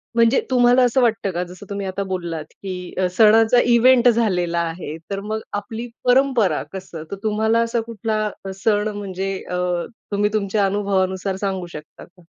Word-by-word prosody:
म्हणजे 230 +2 +4
तुम्हाला 250 0 +5
असं 250 +1 +3
वाटतं 220 -5 +1
का? 175 +1 -2
जसं 180 +3 -11
तुम्ही 200 -1 -4
आता 195 +1 -3
बोललात 175 -5 -4 0.2
की 180 -2 -6
अ, 185 -1 +2
सणाचा 225 +2 +6
इव्हेंट 250 +1 +5
झालेला 180 -7 +1
आहे. 165 -2 -4
तर 195 - -2
मग 215 +1 -3
आपली 220 +4 -4 0.2
परंपरा 245 - +3
कसं? 185 -4 -7
तर - - -2
तुम्हाला 220 +2 +1
असा 230 0 -1
कुठला 220 -1 -2 0.4
सण 210 -1 +2
म्हणजे 195 -1 -3 0.2
अ, 180 - -2 0.6
तुम्ही 205 +1 +1
तुमच्या 200 -1 +1
अनुभवानुसार 190 -1 0
सांगू 190 -2 -2
शकता 150 0 -10
का? 180 0 -19
200 Hz, 160 wpm, -21 LUFS, 185-225 Hz, 0.6 s, सणाचा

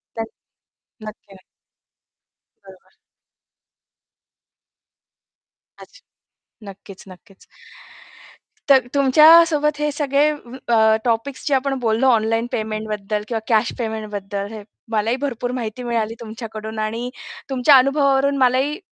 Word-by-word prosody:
त्यान 225 -1 -4 0.8
नक्की, 215 -2 -12
नक्की. 190 - -19 1.2
बरोबर. 190 -1 -17 2.9
अच्छा. - - -17 0.7
नक्कीच, 195 0 -13
नक्कीच. 190 +2 -17 1.2
तर 265 -3 +5
तुमच्यासोबत 300 +2 +5
हे 300 0 0
सगळे 285 0 +1 0.5
अ, 220 -1 +4
टॉपिक्स 245 +5 -2
जे 285 - +2
आपण 270 0 -1
बोललो 230 +2 +1
ऑनलाईन 225 +1 0
पेमेंटबद्दल 215 -1 -3
किंवा 230 -2 -2
कॅश 225 -1 +2
पेमेंटबद्दल, 210 -3 -5
हे 215 -1 -8 0.3
मलाही 220 +3 0
भरपूर 250 -3 -3
माहिती 230 +1 -6
मिळाली 230 -2 -2
तुमच्याकडून. 220 -1 -8
आणि 225 +3 -3 0.4
तुमच्या 265 +2 +5
अनुभवावरून 275 +1 +2
मलाही 265 +4 +1
230 Hz, 100 wpm, -20 LUFS, 215-270 Hz, 2.9 s, तर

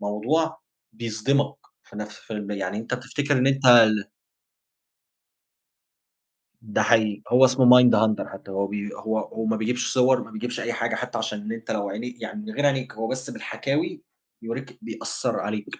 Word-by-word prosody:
موضوع 125 +11 0 0.3
بيصدمك 115 +5 -1 0.3
في - - -15
نَفْس 105 0 -7
الفيلم 105 -2 -6
يعني 100 0 -3
أنت 115 +3 -3
بتفتكّر 130 +3 -1
إن 125 - +2
أنت 135 -1 +2
ال 110 -4 +6 2.5
ده 110 -2 -1
حقيقي، 110 -2 +2
هو 125 +2 +6
اسمه 130 0 +3
Mindhunter 110 -3 +4
حتى 95 0 -10
هو 100 +1 -1
بي 105 0 -4
هو 110 0 -2
هو 110 +1 -5
ما 110 0 +1
بيجيبش 125 +3 -1
صور، 130 0 +4
ما 115 - -14
بيجبش 120 +3 -4
أي 120 +1 -2
حاجة 115 0 -1
حتى 125 -1 -4
عشان 110 -2 -3
إن 110 +2 -5
أنت 115 0 -6
لو 100 -2 -1
عيني 120 +4 -6
يعني 210 - -6
من 220 - -6
غير 145 - 0
عينيك 135 -2 0
هو 115 +1 -3
بس 130 +2 -4
بالحكاوي 140 +2 -3 0.4
يوريك، 125 +2 -6
بيأثّر 110 -1 -3
عليك 105 0 -3
115 Hz, 165 wpm, -24 LUFS, 105-125 Hz, 2.5 s, ال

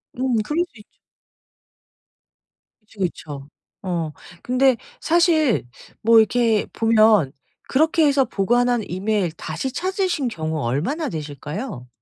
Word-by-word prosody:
음 250 -3 0
그럴 300 +9 0
수 - - -20
있죠. 210 - -14 2.0
그쵸, 215 -1 -22
그쵸. 150 -6 -4 0.3
어 170 -4 -2 0.3
근데 255 +1 +3 0.2
사실 325 - +3 0.4
뭐 225 +1 +6
이렇게 225 -1 +2
보면 220 -9 +4 0.4
그렇게 315 +3 +3
해서 280 -2 +3
보관한 240 +3 +1
이메일 190 0 -1
다시 260 +9 -4
찾으신 370 -4 -1
경우 160 -6 -3
얼마나 170 - -1
되실까요? 150 - -6
225 Hz, 230 characters per minute, -22 LUFS, 175-270 Hz, 2.0 s, 뭐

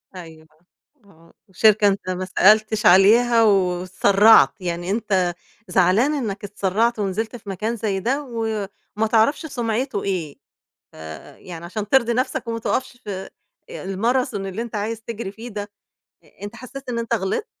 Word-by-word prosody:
أيوه 160 -3 -11 0.6
آه 165 -4 -22 0.2
شركة 210 +2 +4
أنت 195 -2 -1
ما 185 0 -3
سألتش 215 +3 +3
عليها 230 +5 +6
و 220 - +5
واتسرعت 195 +3 +4
يعني 175 0 -3
أنت 190 -5 0 0.3
زعلان 195 +10 +3
إنك 215 -9 -4
اتسرعت 210 +3 0
ونزلت 210 +4 -2
في 210 -4 -10
مكان 215 +5 -3
زي، 205 -3 -2
ده 265 +9 -1
وما 220 -3 -4
تعرفش 230 +8 +2
سمعته 240 -4 -2
إيه 175 -7 -3 0.6
آآ 80 -2 -10
يعني 170 -2 -10
عشان 205 +4 -5
ترضي 235 -1 +3
نفسك 255 0 -2
وما 230 0 -2
تُقفش 245 +2 -2
في 190 -2 -6 0.4
آآ - - -8
الماثرون 220 +2 -1
اللي 195 +4 -4
أنت 235 - -9
عايز 215 +2 -3
تجري 225 -3 -6
فيه 225 +4 -9
ده 205 -2 -6 0.7
أنت 205 +3 -7
حسيت 255 +2 -10
إن 235 -1 -2
أنت 230 +1 -3
غلط؟ 200 - -1
210 Hz, 150 wpm, -21 LUFS, 190-230 Hz, 0.7 s, عليها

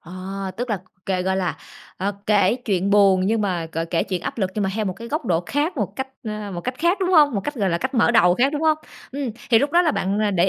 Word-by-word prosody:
Ờ, 170 - -13 0.4
tức 245 0 -3
là 205 - 0 0.3
kể, 185 -2 0
gọi 190 +1 0
là, 180 -3 -1 0.4
ờ, 200 +2 -1
kể 205 +1 +3
chuyện 195 -2 0
buồn 195 -2 +5
nhưng 220 +1 +1
mà 180 -5 -1
gọi 165 +1 -2
kể 165 0 0
chuyện 185 -3 -3
áp - - -5
lực 190 -3 0
nhưng 210 -2 0
mà 190 - 0
theo 220 -1 -1
một 190 - -1
cái 230 +5 -9
góc 305 -2 -2
độ 170 -3 +2
khác, 295 +5 -1
một 205 -4 -3
cách, 265 0 -3 0.2
ờ, 210 -1 -5
một 175 - -4
cách 250 +7 -3
khác, 345 +4 +2
đúng 370 -1 +1
hông? 295 -7 +5
Một 200 - 0
cách, 290 - -3
gọi 200 -7 0
là, 170 - 0
cách 260 +2 -3
mở 235 -1 +4
đầu 180 -7 +5
khác, 270 +7 +2
đúng 295 +1 -2
hông? 310 -1 +3 0.3
Ừm, 275 -4 -3 0.2
thì 225 - +7
lúc 285 +3 0
đó 350 +1 +5
là 320 - +2
bạn, 200 -4 -1
à, 210 - +2
để 190 0 +2
210 Hz, 290 wpm, -22 LUFS, 190-265 Hz, 0.4 s, thì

